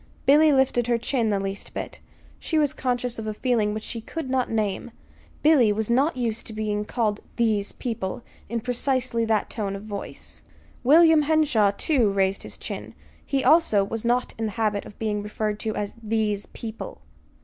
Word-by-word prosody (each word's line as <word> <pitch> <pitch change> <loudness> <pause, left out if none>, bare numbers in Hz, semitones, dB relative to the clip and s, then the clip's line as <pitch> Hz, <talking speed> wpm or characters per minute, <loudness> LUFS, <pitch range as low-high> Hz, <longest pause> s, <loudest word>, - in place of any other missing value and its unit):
Billy 300 +3 +6
lifted 265 -3 +2
her 240 -1 +2
chin 235 -1 0
the 200 -2 +1
least 195 0 -5
bit. - - -5 0.4
She 320 - -1
was 295 -3 +2
conscious 245 -2 -2
of 220 - -5
a 215 - -3
feeling 225 -4 +1
which 215 +1 -4
she 230 - -6
could 270 +2 -5
not 260 -2 +1
name: 215 0 -1 0.5
Billy 290 -8 +5
was 220 +2 -1
not 270 +4 +2
used 235 -2 -2
to 220 - -6
being 210 -1 -2
called 215 -3 -1 0.2
"these 215 -4 +1
people" 230 -3 -4 0.3
in 235 -1 -2
precisely 245 -1 0
that 220 -2 0
tone 200 -3 -3
of 195 - -7
voice. 205 -2 -7 0.4
William 320 +4 +6
Henshaw, 290 -9 +3
too, 255 -9 +3
raised 195 0 +1
his - - -6
chin. - - -7 0.3
He, 270 -1 -1
also, 260 -8 +5
was 215 +2 -3
not 245 +1 +1
in 225 - 0
the 215 - -2
habit 210 -1 0
of 205 - -13
being 210 -2 -1
referred 210 0 -3
to 220 0 -2
as 205 -1 -3
"these 215 -2 -1
people." 225 - -8
225 Hz, 180 wpm, -25 LUFS, 210-255 Hz, 0.5 s, Billy